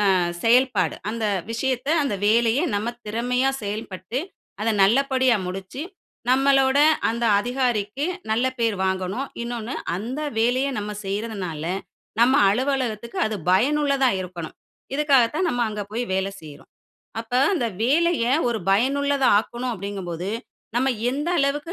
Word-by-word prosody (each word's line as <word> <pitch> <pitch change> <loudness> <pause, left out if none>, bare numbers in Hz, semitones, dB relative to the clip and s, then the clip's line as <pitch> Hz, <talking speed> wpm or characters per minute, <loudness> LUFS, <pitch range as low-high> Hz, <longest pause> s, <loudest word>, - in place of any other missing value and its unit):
அ - - +4 0.3
செயல்பாடு. 230 - +3
அந்த 225 0 -2 0.3
விஷயத்த, 255 +2 -2 0.2
அந்த 275 - -1
வேலைய 230 +3 +3 0.2
நம்ம 210 +3 -1 0.2
திறமையா 250 +4 0
செயல்பட்டு, 205 +2 -4 0.4
அத 225 - +1
நல்லபடியா 260 +3 +3
முடிச்சு, 190 +9 -6 0.5
நம்மளோட 270 0 +4 0.3
அந்த 235 +1 -1
அதிகாரிக்கு 245 +1 -1 0.3
நல்ல 235 +3 +2
பேர் 230 -2 +1
வாங்கணும்". 190 +8 -2 0.2
இன்னொன்னு 235 +1 -4 0.2
"அந்த 235 +9 -4 0.2
வேலைய 250 +4 +2
நம்ம 210 0 -4
செய்றதுனால 195 -6 -4 0.6
நம்ம 255 +3 +5
அலுவலகத்துக்கு 240 -1 -1
அது 215 - -3 0.2
பயனுள்ளதா 275 +5 +3
இருக்கணும்". 175 -3 -7 0.4
இதுக்காகத்தான் 295 +3 +3
நம்ம 245 -3 0
அங்க 210 -1 -4
போய் 235 +3 -2
வேலை 190 +1 0
செய்றோம். 150 -2 -13 0.5
அப்ப 230 +2 -7 0.2
அந்த 250 -9 0 0.2
வேலைய 310 +2 +2 0.2
ஒரு 235 - -1
பயனுள்ளதா 275 +6 +2
ஆக்கணும் 240 +3 -3
அப்டிங்கும்போது, 190 -3 -5 0.5
நம்ம 260 +2 +2 0.2
எந்த 290 +5 -2
அளவுக்கு 290 +4 0
235 Hz, 120 wpm, -23 LUFS, 205-265 Hz, 0.6 s, நம்ம